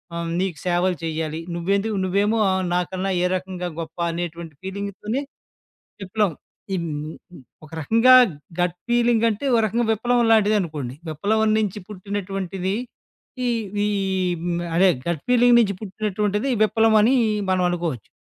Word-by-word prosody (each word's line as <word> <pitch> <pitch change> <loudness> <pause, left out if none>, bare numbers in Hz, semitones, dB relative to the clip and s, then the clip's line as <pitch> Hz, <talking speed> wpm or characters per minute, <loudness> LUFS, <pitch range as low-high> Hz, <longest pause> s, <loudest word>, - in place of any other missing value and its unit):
ఆహ్, 170 0 -3
నీకు 185 -4 -1
సేవలు 180 +1 +1
చేయ్యాలి? 160 0 -3 0.2
నువ్వెందుకు 200 +5 0
నువ్వేమో 200 +4 +1
ఆహ్, 190 0 +1
నాకన్నా 185 +2 -1
ఏ - - +3
రకంగా 185 -1 -4
గొప్ప 160 -1 -7
అనేటువంటి 170 -2 -5
ఫీలింగ్ 200 +1 -4
తోనె 230 +7 -2 0.8
విప్లవం. 195 -2 0 0.4
ఈ - - +1 0.9
ఒక 150 - -15
రకంగా 230 - +4 0.5
గట్ 175 0 0
ఫీలింగంటే 235 -1 +2
ఒక 230 - +4
రకంగా 230 +2 0
విప్లవం 240 +2 +1
లాంటిదనుకోండి. 185 - +1 0.2
విప్లవం 215 +8 +1
నుంచి 210 -1 -1
పుట్టినటువంటిది. 195 -1 -4 0.7
ఈ - - +2 0.3
వి 205 0 +1 0.2
ఈ - - -2 0.4
హ్మ్. 175 0 -1
అదే 190 +2 +6 0.2
గట్ 170 -4 -2
ఫీలింగ్ 245 -1 +6
నించి 200 -4 +1
పుట్టినటువంటిది 210 +3 -1
విప్లవం 220 0 +3
అని 255 +5 +4 0.3
మనం 185 -1 +2
అనుకోవచ్చు. 165 - -3
195 Hz, 130 wpm, -22 LUFS, 175-220 Hz, 0.9 s, అదే